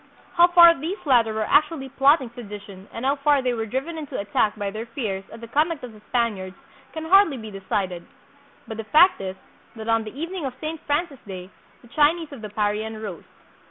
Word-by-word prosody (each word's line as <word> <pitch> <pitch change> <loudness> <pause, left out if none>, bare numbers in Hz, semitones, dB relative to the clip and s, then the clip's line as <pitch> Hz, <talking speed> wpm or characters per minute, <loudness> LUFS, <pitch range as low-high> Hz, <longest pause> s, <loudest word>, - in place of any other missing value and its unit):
How 345 +1 +6
far 345 -1 +8
these 330 +8 -4
latter 240 -5 +4
were 215 0 -1
actually 300 -2 +2
plotting 275 -1 +3
sedition 205 -4 -10
and 230 - -6
how 280 +2 +2
far 280 -1 +2
they 250 -1 +1
were 225 -1 -3
driven 275 +8 -3
into 290 -3 -6
attack 205 +1 0
by 200 -2 -3
their 220 +3 -6
fears 215 -6 -4
at 225 - -11
the 230 - -8
conduct 300 +4 0
of 245 -3 -8
the 215 - -16
Spaniards 205 -6 -1 0.4
can 315 0 -6
hardly 365 -4 +5
be 220 -2 -8
de 195 -1 -8
cided. 185 -4 -1 0.6
But 220 - -6
the 225 - -4
fact 330 - +5
is, 190 -1 -4 0.4
that 220 0 -8
on 225 0 +2
the 220 +6 -9
evening 340 0 -4
of 255 - -7
Saint 315 +1 -4
Francis 290 -1 -1
day 185 -1 -8 0.3
the - - -16
Chinese 310 +3 +2
of 275 -5 -9
the 215 - -6
Parian 215 +1 -2
rose. 200 -6 -7
240 Hz, 210 wpm, -24 LUFS, 215-300 Hz, 0.6 s, far